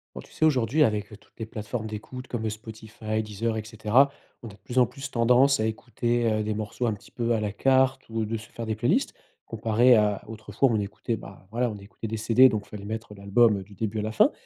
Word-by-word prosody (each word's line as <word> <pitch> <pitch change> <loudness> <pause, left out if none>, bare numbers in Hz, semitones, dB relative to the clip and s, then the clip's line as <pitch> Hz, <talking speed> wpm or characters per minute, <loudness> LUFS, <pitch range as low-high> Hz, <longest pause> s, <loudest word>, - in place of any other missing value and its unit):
Oh, - - -6
tu - - -18
sais 160 - +1
aujourd'hui 135 0 +3
avec 105 -5 0
toutes - - -27
les 110 - -4
plateformes 110 +1 -5
d'écoute 120 +4 -7
comme 110 -2 -3
Spotify, 110 0 -5
Deezer, 110 +2 -2
et 110 - -3
cetera, 110 +5 +3 0.3
on - - -6
a - - -9
de - - -16
plus 125 - -7
en 125 - +7
plus 135 0 -8
tendance 125 +3 +4
à 110 - +1
écouter, 120 +1 -1
heu, 110 0 0
des 110 - -1
morceaux 110 +3 -3
un 110 - +1
petit 100 - -13
peu 120 -1 -1
à 115 - +1
la 105 -1 -2
carte 130 +4 +2
ou 115 0 -1
de 115 +2 -2
se 110 +1 -11
faire 115 -1 -7
des 110 - -1
playlists. 110 - +1 0.3
Comparé 115 +2 +4
à 105 -2 +2
autrefois 110 +5 0
où - - +1
on - - +1
écoutait, 110 +3 -3
bah, 95 -2 -13
voilà, 120 +3 0
on - - -7
écoutait 100 +3 -8
des 110 +1 -3
CD, 115 +4 +6
donc 110 -4 -2
fallait 100 -1 -9
mettre 110 0 -5
l'album 100 +1 +3
du 100 +2 -16
début 110 +1 -3
à - - 0
la 110 - -2
fin. 110 - +4
110 Hz, 245 wpm, -26 LUFS, 105-120 Hz, 0.3 s, en